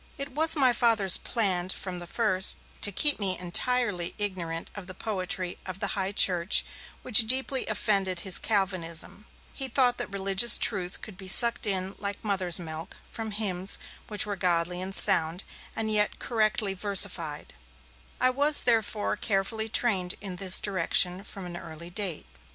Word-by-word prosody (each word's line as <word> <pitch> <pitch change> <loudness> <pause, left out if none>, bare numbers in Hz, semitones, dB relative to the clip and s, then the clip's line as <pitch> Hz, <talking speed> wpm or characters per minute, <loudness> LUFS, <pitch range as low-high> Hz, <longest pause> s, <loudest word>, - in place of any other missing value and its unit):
It 275 0 -6
was 320 +4 +2
my 260 -4 +2
Father's 225 -6 +3
plan 185 -6 -1
from 185 -1 -5
the 175 - -8
first 190 -3 +3 0.2
to 205 - +3
keep 290 +7 +3
me 190 -3 0
entirely 185 0 -1
ignorant 175 -5 -5
of 200 -3 -11
the 185 - -10
poetry 185 -3 -5
of 185 0 -9
the 200 - -3
High 195 -1 -3
Church, 180 -2 +3 0.4
which 225 -2 +6
deeply 260 +2 +1
offended 195 -4 -2
his 190 0 +2
Calvinism; 190 -1 -2 0.3
he 270 - -1
thought 250 -1 +1
that - - -5
religious 195 +3 +3
truth 185 -4 -1
could 210 -4 -10
be 190 -1 -10
sucked 235 +3 +6
in, 190 -1 -2
like 200 +1 -5
mother's 190 -5 0
milk, 160 +1 -9
from 225 -1 -7
hymns 200 -3 +1 0.3
which 210 -1 +1
were 205 -1 -5
godly 180 -1 -2
and 190 +1 -6
sound, 180 -2 +4 0.3
and 220 -1 -2
yet 210 -1 +1
correctly 215 -3 -2
versified; 185 -6 0 0.7
and 255 - 0
I - - +5
was 290 +3 +4
therefore 220 -3 -1
carefully 220 +2 -4
trained 195 -6 -1
in 190 -3 -8
this 185 0 +5
direction 185 -1 -1
from 195 -2 -7
an 175 -1 -9
early 170 0 -11
date. 190 -4 -3
195 Hz, 160 wpm, -25 LUFS, 180-220 Hz, 0.7 s, which